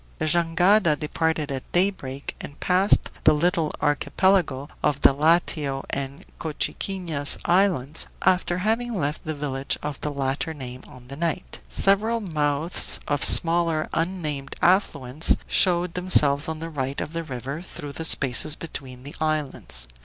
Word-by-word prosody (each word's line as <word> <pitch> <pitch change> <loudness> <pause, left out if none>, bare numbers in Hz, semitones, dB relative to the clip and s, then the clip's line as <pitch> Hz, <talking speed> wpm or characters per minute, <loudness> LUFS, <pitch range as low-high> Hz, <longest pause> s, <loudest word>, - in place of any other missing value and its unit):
The - - -2
jangada 170 +1 +3
departed 155 -1 -2
at 135 -1 -6
daybreak, 175 -8 -2
and 145 - -10
passed 185 +2 +2
the - - +5
little 165 0 0
archipelago 145 -1 +1
of 140 -2 0
the - - +6
Iatio 150 -2 +1
and 140 0 -5
Cochiquinas 160 -1 -1
islands, 170 -6 +2 0.2
after 180 -1 +2
having 225 +5 -1
left 150 -4 -3
the 155 0 -3
village 140 -2 -3
of 150 -1 -5
the 150 - -2
latter 140 +3 -3
name 130 -2 -8
on 125 -1 -15
the 140 +2 -9
right. 170 +2 -3
Several 215 +4 +2
mouths 155 -4 0
of 145 -1 -1
smaller 165 -2 +4
unnamed 155 -6 -3
affluents 155 -6 +1
showed 175 -2 +2
themselves 150 -5 +2
on 160 - -4
the 165 +1 -7
right 135 -2 -4
of 155 - -5
the 165 0 -3
river 135 +1 -6
through 145 -5 -8
the 165 - -5
spaces 145 0 +5
between 130 -6 -7
the 140 - -10
islands. 145 - -2
155 Hz, 145 wpm, -24 LUFS, 140-175 Hz, 0.2 s, the